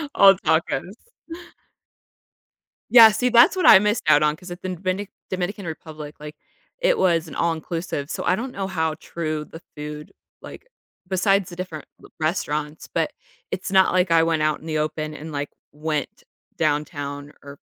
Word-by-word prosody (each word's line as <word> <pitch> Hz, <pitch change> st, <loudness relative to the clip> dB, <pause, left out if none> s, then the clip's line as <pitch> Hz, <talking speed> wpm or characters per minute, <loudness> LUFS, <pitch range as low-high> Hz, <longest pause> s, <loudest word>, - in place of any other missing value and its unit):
All 195 Hz, -1 st, +8 dB
tacos. 175 Hz, +1 st, 0 dB, 2.0 s
Yeah, 230 Hz, -2 st, +10 dB
see, 250 Hz, +4 st, 0 dB
that's 240 Hz, +8 st, +6 dB
what 370 Hz, -, +2 dB
I 190 Hz, -, +10 dB
missed 210 Hz, +2 st, 0 dB
out 150 Hz, -1 st, +5 dB
on 150 Hz, 0 st, +2 dB
'cause 180 Hz, +3 st, -12 dB
at 175 Hz, -, -8 dB
then 185 Hz, -1 st, -4 dB
Venic 185 Hz, +3 st, -3 dB, 0.2 s
Dominican 190 Hz, +2 st, -3 dB
Republic, 155 Hz, -2 st, -8 dB
like, 150 Hz, 0 st, -9 dB, 0.4 s
it -, -, +2 dB
was 170 Hz, -2 st, +2 dB
an -, -, -10 dB
all-inclusive 165 Hz, -2 st, -2 dB
so -, -, -4 dB
I 180 Hz, -, +2 dB
don't 250 Hz, +5 st, -5 dB
know 195 Hz, -4 st, -4 dB
how 160 Hz, -4 st, -1 dB
true 155 Hz, -1 st, -4 dB
the 165 Hz, -, -12 dB
food, 150 Hz, 0 st, -8 dB, 0.3 s
like -, -, -11 dB, 0.4 s
besides 195 Hz, 0 st, +1 dB
the 175 Hz, -, -9 dB
different 170 Hz, -4 st, -6 dB, 0.2 s
l -, -, -15 dB
restaurants 155 Hz, -2 st, -2 dB
but, -, -, -1 dB, 0.4 s
it's 185 Hz, -, -4 dB
not 190 Hz, -1 st, +4 dB
like 180 Hz, -1 st, +2 dB
I 165 Hz, -1 st, +5 dB
went 165 Hz, -1 st, +1 dB
out 155 Hz, 0 st, +1 dB
in -, -, -15 dB
the 155 Hz, -1 st, -2 dB
open 155 Hz, 0 st, -3 dB
and, 155 Hz, +1 st, -8 dB
like, 145 Hz, 0 st, -3 dB, 0.2 s
went 150 Hz, -1 st, -4 dB, 0.3 s
downtown 145 Hz, -2 st, -2 dB
or 140 Hz, 0 st, -12 dB
165 Hz, 170 wpm, -23 LUFS, 150-190 Hz, 2.0 s, Yeah